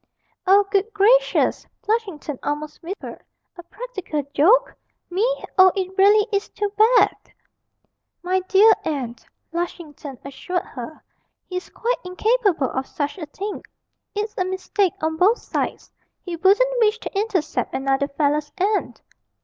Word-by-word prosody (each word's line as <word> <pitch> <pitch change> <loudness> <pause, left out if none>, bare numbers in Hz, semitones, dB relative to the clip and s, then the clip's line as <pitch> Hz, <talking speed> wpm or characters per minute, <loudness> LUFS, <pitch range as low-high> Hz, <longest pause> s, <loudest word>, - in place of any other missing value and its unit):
'Oh, 400 +2 +6
good 405 +2 +1
gracious!' 480 +5 +3 0.2
Flushington 385 - -2
almost 300 +1 -4
whimpered; 370 +4 -7 0.3
'a 350 - -9
practical 380 -5 -5
joke! 430 +13 +4 0.4
me, 370 +3 -1 0.4
oh, 375 0 +8
it 380 -1 -3
really 410 +2 +5
is 400 0 -1
too 410 -1 -3
bad!' 455 +3 +3 0.9
'My 370 +1 +1
dear 405 +4 +6
aunt,' 250 -7 -4 0.3
Lushington 315 -5 -5
assured 355 +6 -3
her, 260 -1 -9 0.4
'he's 365 0 -6
quite - - -1
incapable 365 - +1
of 265 0 -3
such 295 +5 -4
a 315 - -6
thing; 400 +7 -6 0.5
it's 425 +1 -2
a - - +3
mistake 375 +1 0
on 320 0 0
both 410 +8 +4
sides; - - -4 0.3
he 355 -2 -4
wouldn't 425 +8 +3
wish 435 -1 +3
to 450 - -8
intercept 395 -6 -1
another 270 +1 0
fellow's 295 +1 0
aunt.' 405 +3 -1
375 Hz, 135 wpm, -22 LUFS, 305-420 Hz, 0.9 s, oh